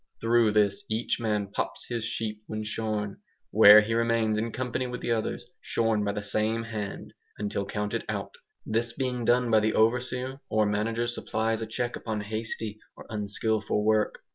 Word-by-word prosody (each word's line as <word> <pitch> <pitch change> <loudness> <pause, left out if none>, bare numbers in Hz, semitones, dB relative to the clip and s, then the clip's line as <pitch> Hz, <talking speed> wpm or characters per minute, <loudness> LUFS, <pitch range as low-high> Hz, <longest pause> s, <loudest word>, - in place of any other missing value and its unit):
Through 115 -1 +3
this 100 -2 +2
each 110 +3 0
man 105 -3 -1
pops - - -3
his 120 -2 -3
sheep 110 -2 -3
when 110 0 -4
shorn, 105 -2 -3 0.3
where 105 +1 +9
he 110 +2 -2
remains 115 -2 +2
in 115 +1 -2
company 125 +1 -2
with 125 0 -5
the - - -2
others 110 -2 -1
shorn 110 -2 0
by 100 - 0
the 105 0 -4
same 110 +2 0
hand, 110 -3 -6 0.2
until 100 -1 -2
counted 105 0 -2
out. - - -3 0.3
This 115 +1 -1
being 125 -2 -2
done 120 0 +3
by 110 - +6
the 110 +1 +1
overseer 125 +3 +1
or 110 0 +3
manager 110 +3 0
supplies 115 -1 -1
a 110 - -3
check 120 +2 -2
upon 110 -2 -3
hasty 110 0 -4 0.2
or - - -11
unskilful 105 0 -1
work. 110 -1 +1
110 Hz, 170 wpm, -28 LUFS, 105-115 Hz, 0.3 s, where